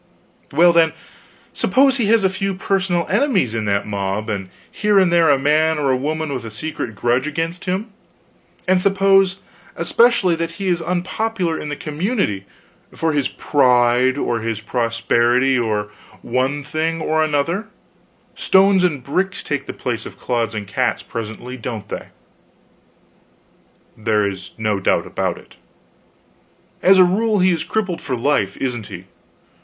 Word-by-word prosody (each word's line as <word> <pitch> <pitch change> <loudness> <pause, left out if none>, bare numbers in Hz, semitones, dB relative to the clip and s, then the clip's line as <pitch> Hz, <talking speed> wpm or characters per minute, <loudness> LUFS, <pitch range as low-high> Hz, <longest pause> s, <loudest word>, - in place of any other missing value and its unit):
"Well, 170 +4 +5
then, 165 -1 +4 0.6
suppose 270 0 +3
he 230 -5 0
has 225 -1 +4
a 190 - +4
few 195 0 -2
personal 185 -3 0
enemies 205 - +1
in 110 -1 -2
that 100 0 0
mob 100 +1 -3
and 95 -3 -4 0.2
here 210 -1 +1
and 185 -3 +4
there 170 -2 +5
a 140 - +5
man 155 +3 +2
or 140 -3 +1
a - - +3
woman 155 +3 -2
with 125 - -4
a 115 - -6
secret 115 -1 -5
grudge 120 +6 0
against 165 +3 -3
him 195 +4 -2 0.8
and 185 0 +3
suppose 195 -1 +3 0.3
especially 235 -7 +3
that 165 0 -3
he 190 +2 -3
is 175 -1 +1
unpopular 180 +1 -2
in 150 - -5
the 145 - -3
community, 150 - -2 0.4
for 160 -1 -1
his 145 -2 +1
pride, 125 -1 +2
or 120 -4 -1
his 115 -1 -3
prosperity, 120 +3 +1
or 105 -3 -1 0.3
one 130 +4 -1
thing 160 +3 -2
or 155 0 +1
another 155 +7 -1 0.7
stones 190 0 +4
and 150 -8 0
bricks 185 +8 -2
take 145 -3 -3
the - - -3
place 120 -2 -4
of - - -12
clods 115 -3 -2
and 105 -1 -4
cats 120 +3 -1
presently, 115 +2 -6
don't 115 -3 -6
they?" - - -6 1.9
"There 105 -1 +1
is 95 -1 -5
no 105 -3 -1
doubt 95 - +1
of - - -2
it." - - -17 1.2
"As 190 +1 +6
a 185 - +8
rule 210 +4 +1
he 185 -1 +4
is 165 -2 -1
crippled 195 -6 -2
for 130 - -3
life, 115 -6 0
isn't 120 -5 -3
he? - - -9
150 Hz, 155 wpm, -19 LUFS, 120-185 Hz, 1.9 s, a